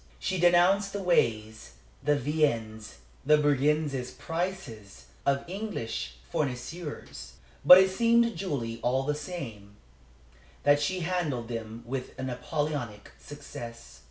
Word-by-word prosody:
She 185 - -2
denounced 175 +3 +4
the 200 -1 -3
ways, 110 -11 0 0.3
the 145 0 +2
viands, 115 -7 -1 0.3
the 150 +2 +5
brigand's 145 -2 +1
prices 130 - -5 0.2
of 140 0 +1
English 180 - -4 0.2
fournisseurs, 135 - -4 0.3
but 180 - +11
it 190 0 +5
seemed 235 +3 +4
to 235 - -1
Julie, 140 - -4
all 130 +2 +1
the 150 +2 0
same, 135 - -7 0.9
that 145 0 +4
she 185 +5 -1
handled 160 -9 -2
them 115 0 -6
with 130 +1 -5
a 130 - -5
Napoleonic 130 -3 -3
success. 120 - -10
145 Hz, 120 wpm, -28 LUFS, 115-175 Hz, 0.9 s, but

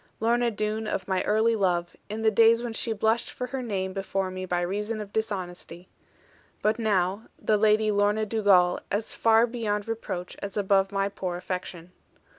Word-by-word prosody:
Lorna 235 +2 +2
Doone 215 0 -2
of - - -3
my 190 -1 +1
early 220 +2 +3
love; 175 -4 0
in 220 +2 -4
the 220 - +4
days 230 +2 +5
when 235 -2 -4
she 225 - -1
blushed 220 +2 +1
for 250 - -5
her 260 +1 -4
name 190 -5 -3
before 195 -1 -2
me 185 0 -5
by 175 0 0
reason 210 +5 -2
of 205 -1 -8
dishonesty; 185 -4 -4 0.7
but 215 +2 +2
now 200 -1 0
the 215 - +1
Lady 215 0 +3
Lorna 205 +1 +2
Dugal 200 -5 +3
as 205 +2 -2
far 225 0 +4
beyond 220 -4 -2
reproach 185 -5 -4
as 200 0 -5
above 195 -1 +2
my 195 0 0
poor 185 -3 -4
affection. 180 -1 -6
205 Hz, 175 wpm, -26 LUFS, 190-220 Hz, 0.7 s, days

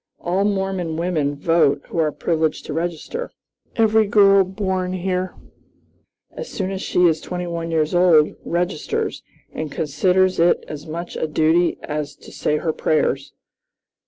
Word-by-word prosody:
All 185 +3 0
Mormon 190 -5 -1
women 160 -4 0
vote 155 -1 +2
who - - -3
are 155 -2 +2
privileged 160 0 -1
to 150 - -5
register. 175 - -3 0.5
Every 220 -1 +3
girl 200 -1 +6
born 190 -1 -2
here, 185 0 -2 1.0
as 485 - -7
soon 190 -1 -3
as 190 -1 -4
she 180 - +2
is 160 -2 +3
twenty 180 0 -4
one 170 -1 -4
years 160 -1 0
old, 175 -4 +5
registers, 175 -2 -2 0.3
and 155 -2 -4
considers 185 +5 +1
it 170 +1 +3
as 150 +1 -8
much 170 +2 -6
a 160 - -1
duty 160 +3 +2
as 150 -1 -4
to - - -15
say 150 - 0
her 160 +1 -1
prayers. 140 -4 0
170 Hz, 150 wpm, -21 LUFS, 155-185 Hz, 1.0 s, girl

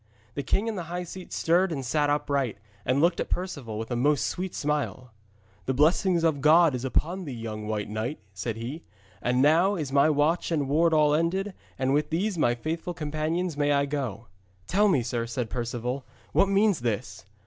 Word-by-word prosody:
The 140 - -3
king 195 - 0
in 225 - -1
the 175 -3 -4
high 180 +1 -3
seat 180 +1 -9
stirred 175 +3 +2
and 135 -5 -3
sat 145 +4 +1
upright, 140 -6 0 0.3
and 130 +2 +2
looked 170 +3 +3
at - - -2
Perceval 140 - -3
with 115 +2 -5
a - - 0
most 140 +2 +2
sweet 185 0 -3
smile. 145 -4 -2 0.6
'The 130 - 0
blessing 170 +4 +3
of 155 -4 +2
God 160 +1 +6
is 125 -1 -3
upon 175 +8 -1
thee, 140 - -5
young 110 -2 -5
White 105 -1 -2
Knight,' 110 +7 -3
said 105 +4 -3
he, 125 +8 -5 0.4
'and 125 +2 +2
now 170 +7 +4
is 150 -7 -3
my 140 +2 +5
watch 155 +3 +1
and 145 -4 0
ward 165 +4 +3
all 150 -2 +4
ended, 185 +6 0 0.2
and 135 0 +1
with 150 +1 +1
these 190 +5 0
my 120 -7 +2
faithful 165 +7 -4
companions 155 +2 -2
may 145 0 +1
I 140 0 +2
go.' 130 -6 -4 0.4
'Tell 205 - +3
me, 145 -11 +3
sir,' 115 0 -2
said 115 -1 -3
Perceval, 125 +2 -3 0.3
'what 195 - +3
means 200 -3 +3
this?' 120 -2 -3
145 Hz, 195 wpm, -27 LUFS, 125-170 Hz, 0.6 s, God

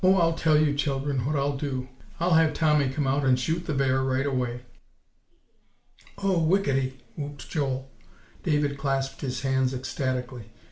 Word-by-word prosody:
I'll 185 -3 +5
tell 160 -2 +3
you, 150 -1 +3
children, 140 -2 -1
what 150 - 0
I'll 140 0 0
do; 135 -2 -3 0.3
I'll 175 +1 +2
have 160 -1 +4
Tommy 150 -4 +3
come 140 +2 -1
out 135 +2 +1
and 130 -1 +3
shoot 165 +6 -2
the 150 - 0
bear 130 -1 +2
right 130 +1 0
away." 125 -3 -1 1.6
"Oh, 195 -3 +1
whickety!" 140 -7 +1 0.2
whooped 145 -1 -6
Joel. 135 -3 -2 0.5
David 145 -3 0
clasped 135 -1 -1
his 130 -3 -3
hands 130 -1 +1
ecstatically. 125 -3 -4
140 Hz, 150 wpm, -26 LUFS, 130-150 Hz, 1.6 s, I'll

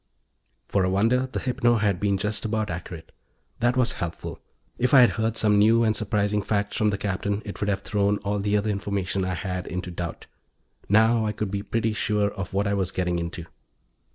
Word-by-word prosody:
For 100 - +1
a 90 - +1
wonder, 115 +7 +2
the 130 - -4
hypno 125 -2 +1
had 105 -4 +1
been 100 -1 +1
just 105 +2 -1
about 110 -2 -1
accurate. 85 -1 -7 0.5
That 120 +2 +2
was 125 -2 +3
helpful; 85 -2 -5 0.4
if 125 +3 +3
I'd 125 -5 +8
heard 110 +4 -1
some 105 -1 +4
new 115 +3 +5
and 110 -1 +2
surprising 105 -1 0
facts 100 0 -1
from 110 - +2
the 100 - -1
Captain 100 +1 -2
it 100 - -7
would 105 - -1
have 100 - 0
thrown 105 0 +1
all 100 +1 0
the 105 +1 +1
other 105 +1 0
information 100 -1 -2
I 90 -1 -1
had 90 +1 -4
into 90 +1 -4
doubt. 85 -1 -5 0.6
Now 110 +2 +4
I 105 - -1
could 105 -2 -3
be 100 -1 -2
pretty 115 +1 -1
sure 105 -1 0
of 95 -2 -6
what 100 +2 0
I 100 - 0
was 95 -2 0
getting 90 -2 -1
into. 85 0 -5
105 Hz, 205 wpm, -25 LUFS, 95-110 Hz, 0.6 s, I'd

